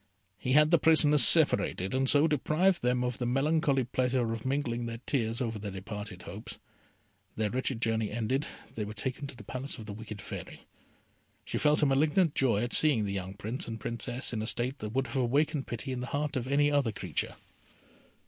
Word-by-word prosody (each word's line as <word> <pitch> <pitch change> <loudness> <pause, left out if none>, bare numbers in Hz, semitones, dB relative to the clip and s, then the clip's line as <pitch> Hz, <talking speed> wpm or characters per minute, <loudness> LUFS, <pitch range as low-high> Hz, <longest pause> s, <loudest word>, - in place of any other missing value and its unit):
He 130 - -1
had 150 +2 +5
the 170 - +5
prisoners 150 -2 +5
separated, 95 +2 +4
and 130 0 +1
so 145 +2 +5
deprived 165 +5 +1
them 125 0 +1
of 125 -1 -3
the 120 - -1
melancholy 140 +1 +2
pleasure 125 -1 0
of 115 +2 -5
mingling 120 -4 -1
their 115 0 -5
tears 115 -4 -1
over 115 -3 -2
their 100 0 -5
departed 100 0 -7
hopes. 110 +6 -8 0.8
Their 105 -2 -1
wretched 130 -1 -2
journey 110 -2 0
ended, 120 +5 -1 0.3
they 110 - -3
were 105 +1 -7
taken 130 +6 -4
to 140 - -9
the 120 - -11
palace 130 +6 -3
of 110 - -9
the 105 - -6
wicked 105 -1 -8
Fairy. - - -8 0.8
She - - -3
felt 150 0 +3
a - - +6
malignant 150 +4 +2
joy 120 -5 +2
at 120 - -3
seeing 140 -9 +4
the 100 - -3
young 95 0 -5
Prince 110 +5 -4
and 115 -1 -5
Princess 120 +3 -3
in 110 - -2
a 110 - -3
state 125 +4 -1
that 105 - -5
would 135 +1 +1
have 130 +2 -5
awakened 140 +3 +1
pity 120 +2 -4
in 130 - -3
the 125 - -5
heart 145 +1 -2
of 130 -1 -2
any 145 +2 +3
other 140 -6 +2
creature. 90 -6 -4
125 Hz, 205 wpm, -30 LUFS, 110-140 Hz, 0.8 s, a